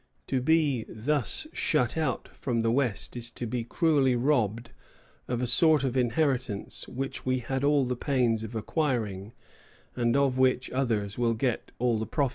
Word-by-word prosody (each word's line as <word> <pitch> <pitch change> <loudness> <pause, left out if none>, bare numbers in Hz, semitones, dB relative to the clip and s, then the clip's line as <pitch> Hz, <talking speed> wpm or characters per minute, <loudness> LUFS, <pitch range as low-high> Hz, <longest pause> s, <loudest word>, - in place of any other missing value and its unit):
To 130 -2 -1
be 145 -4 +2
thus 125 +2 -1
shut 120 -2 +1
out 155 -6 -1
from 115 -3 -2
the 115 - +2
West 125 -5 0
is 120 -1 -2
to 120 - -5
be 125 +2 -2
most 115 0 -7
cruelly 145 -7 +3
robbed 120 -4 0 0.6
of 120 0 -2
a - - +2
sort 150 +4 +4
of 130 -2 -1
inheritance 125 -4 0
which 135 +2 -5
we 130 0 +1
had 130 +2 -3
all 145 -1 +3
the 125 0 -1
pains 120 -4 +1
of 110 +1 -7
acquiring, 110 - -2 0.6
and 120 +1 +1
of 135 -2 +2
which 130 -1 +2
others 115 -5 -1
will 115 -1 +2
get 120 +1 -2
all 120 -2 +1
the 110 - -3
profit." 140 -4 0
125 Hz, 175 wpm, -28 LUFS, 115-135 Hz, 0.6 s, sort